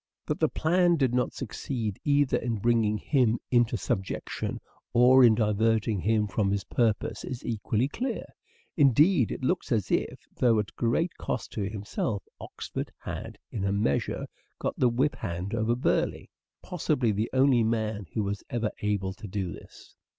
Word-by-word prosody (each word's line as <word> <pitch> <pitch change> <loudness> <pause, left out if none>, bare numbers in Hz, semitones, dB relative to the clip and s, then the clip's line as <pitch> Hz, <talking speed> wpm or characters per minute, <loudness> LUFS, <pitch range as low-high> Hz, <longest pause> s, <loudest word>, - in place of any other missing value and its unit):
That - - -2
the - - +3
plan 175 +2 +3
did 135 -6 +1
not 125 0 +1
succeed 115 -4 -4
either 145 -2 +3
in 115 0 -2
bringing 110 0 +2
him 120 -2 +2
into 120 -1 +3
subjection 95 0 -3 0.3
or 125 +2 +7
in 115 -3 +7
diverting 110 -1 +1
him 105 +3 +2
from 100 0 0
his 100 0 0
purpose 115 0 0
is 125 -1 -6
equally 115 +1 0
clear. 245 - -3 0.5
Indeed, 145 - +4
it - - -5
looks 165 +2 0
as 110 -5 0
if, - - -1
though 120 -3 +3
at 105 -2 -2
great 125 +9 0
cost - - -3
to 100 -2 -2
himself, 105 0 -3 0.2
Oxford - - -6
had - - -7
in 100 - -3
a 100 - +1
measure 100 -9 0 0.3
got - - -2
the 125 - +3
whip 130 +5 0
hand 95 0 -4
over 115 +1 +1
Burleigh: 125 - 0 0.3
possibly 145 -9 0
the 105 +3 -1
only 130 -3 +4
man 110 -3 -1
who 110 - +1
was 100 0 -3
ever 115 -3 -1
able 100 -2 -1
to 105 - -10
do 95 -2 -3
this. - - -14
115 Hz, 165 wpm, -28 LUFS, 105-130 Hz, 0.5 s, or